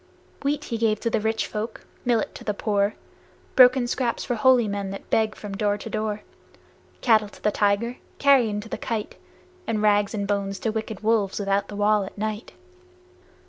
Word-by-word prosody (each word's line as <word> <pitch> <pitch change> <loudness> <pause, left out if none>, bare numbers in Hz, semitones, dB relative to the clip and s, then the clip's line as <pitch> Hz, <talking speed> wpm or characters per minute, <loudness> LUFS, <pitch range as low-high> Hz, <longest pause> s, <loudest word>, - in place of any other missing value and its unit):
Wheat 290 +1 -1
he 230 -5 -4
gave 215 -2 +2
to 230 - -1
rich 220 +1 0
folk, 215 +1 -5 0.2
millet 240 -2 +1
to - - -10
the 210 - -2
poor, 205 -1 0 0.6
Broken 255 -1 +7
scraps 240 -1 -1
for 250 - -1
holy 240 0 +4
men 200 -1 -3
that 195 - -8
beg 220 -1 +2
from 205 -2 -7
door 205 0 +1
to 215 +2 -8
door; 215 -1 -2 0.8
Battle 215 -4 +4
to - - -17
the 210 - +3
tiger, 205 +4 +1 0.2
carrion 250 -7 +4
to 215 - -10
the - - -5
kite, 220 -3 -3 0.5
And 220 -2 0
rags 205 0 +3
and 200 -1 -2
bones 200 -1 -1
to 225 - 0
wicked 220 -2 -4
wolves 215 -3 +1
without 200 0 0
the 205 - -8
wall 205 0 +3
at 190 - -9
night. 215 +2 -4
215 Hz, 180 wpm, -24 LUFS, 205-230 Hz, 0.8 s, Broken